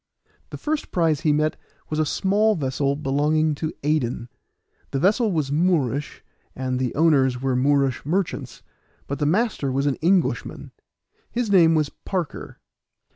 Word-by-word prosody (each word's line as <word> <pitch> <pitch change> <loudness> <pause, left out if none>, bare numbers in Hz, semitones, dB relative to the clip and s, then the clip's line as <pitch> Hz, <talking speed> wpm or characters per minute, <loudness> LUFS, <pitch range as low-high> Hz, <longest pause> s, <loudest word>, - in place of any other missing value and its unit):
The - - -7
first 310 0 -3
prize 160 -5 +1
he 155 - +2
met 155 +1 +1 0.3
was 155 - -1
a 155 - +1
small 210 +6 +2
vessel 140 -2 -1
belonging 150 +2 +1
to 155 +2 -3
Aden; 130 -5 -1 0.6
the - - -2
vessel 210 - +2
was 155 -5 -1
Moorish, 150 -4 0 0.3
and 130 -1 -2
the 125 -2 -2
owners 135 -5 +3
were 130 0 0
Moorish 135 0 +1
merchants, 180 +5 -3 0.4
but 140 - -4
the 145 - +1
master 185 - 0
was 135 +2 0
an 140 -2 0
Englishman; 180 +2 0 0.6
his 235 -3 -2
name 165 -4 +6
was 155 -2 +1
Parker. 180 -5 -5
150 Hz, 145 wpm, -23 LUFS, 135-175 Hz, 0.6 s, name